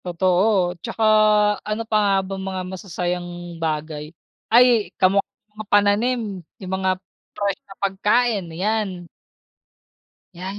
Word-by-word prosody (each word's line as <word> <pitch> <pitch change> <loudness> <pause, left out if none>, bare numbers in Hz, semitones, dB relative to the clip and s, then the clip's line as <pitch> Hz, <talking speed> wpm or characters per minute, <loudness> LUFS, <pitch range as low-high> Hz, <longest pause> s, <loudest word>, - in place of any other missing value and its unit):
Totoo, 180 +1 +2
'tsaka 225 - -3 0.7
ano 215 +1 -1
pa 215 - 0
nga 200 -1 +3
ba 195 - -5 0.2
mga 190 -1 -3
masasayang 180 -1 -3 0.3
bagay, 155 -1 -3 0.5
ay 240 -3 +5
kamukha 195 +1 +4 0.3
mga 215 0 -8
pananim 205 0 +2 0.2
yung 190 -1 -6
mga 190 0 +1 0.5
fresh 200 -2 -1
na 195 - -11
pagkain, 205 +2 +1
yan. 190 +1 -2 1.3
Yan, 185 +3 -6
195 Hz, 115 wpm, -22 LUFS, 180-215 Hz, 1.3 s, ay